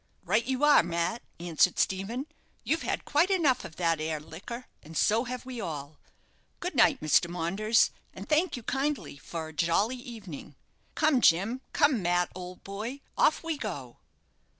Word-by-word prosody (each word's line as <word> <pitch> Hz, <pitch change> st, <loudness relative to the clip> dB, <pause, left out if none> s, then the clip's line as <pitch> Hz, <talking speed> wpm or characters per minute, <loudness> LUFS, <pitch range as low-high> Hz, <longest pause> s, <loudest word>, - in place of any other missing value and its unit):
"Right 215 Hz, +7 st, +2 dB
you 260 Hz, +2 st, -1 dB
are, 295 Hz, 0 st, +7 dB
Mat," 170 Hz, +6 st, -1 dB, 0.2 s
answered 175 Hz, +1 st, +2 dB
Stephen. 205 Hz, +8 st, -1 dB, 0.4 s
"You've 320 Hz, -, 0 dB
had -, -, -2 dB
quite 315 Hz, +6 st, +3 dB
enough 315 Hz, -10 st, +2 dB
of 160 Hz, -, -9 dB
that 165 Hz, -2 st, +1 dB
'ere 155 Hz, -1 st, -2 dB
liquor, 200 Hz, +11 st, -8 dB, 0.2 s
and 160 Hz, +1 st, -8 dB
so 225 Hz, +4 st, +3 dB
have 250 Hz, +1 st, -5 dB
we 255 Hz, -3 st, -6 dB
all. 150 Hz, -4 st, -6 dB, 0.6 s
Good 360 Hz, 0 st, -3 dB
night, 240 Hz, -5 st, +4 dB
Mr. 155 Hz, +3 st, +3 dB
Maunders, 195 Hz, +6 st, +2 dB, 0.2 s
and -, -, -9 dB
thank 310 Hz, 0 st, +2 dB
you 245 Hz, -, -8 dB
kindly 270 Hz, -, -2 dB
for 160 Hz, +2 st, -6 dB
a -, -, -12 dB
jolly 185 Hz, +10 st, +1 dB
evening. 215 Hz, -, -9 dB, 0.4 s
Come, 300 Hz, -5 st, +3 dB
Jim. 210 Hz, +10 st, +3 dB
Come, 280 Hz, -7 st, +3 dB
Mat, 175 Hz, 0 st, +1 dB
old 180 Hz, 0 st, -9 dB
boy 220 Hz, +8 st, -5 dB
off 310 Hz, -, +3 dB
we 325 Hz, -3 st, -3 dB
go!" 135 Hz, -, -5 dB
210 Hz, 165 wpm, -29 LUFS, 170-260 Hz, 0.6 s, are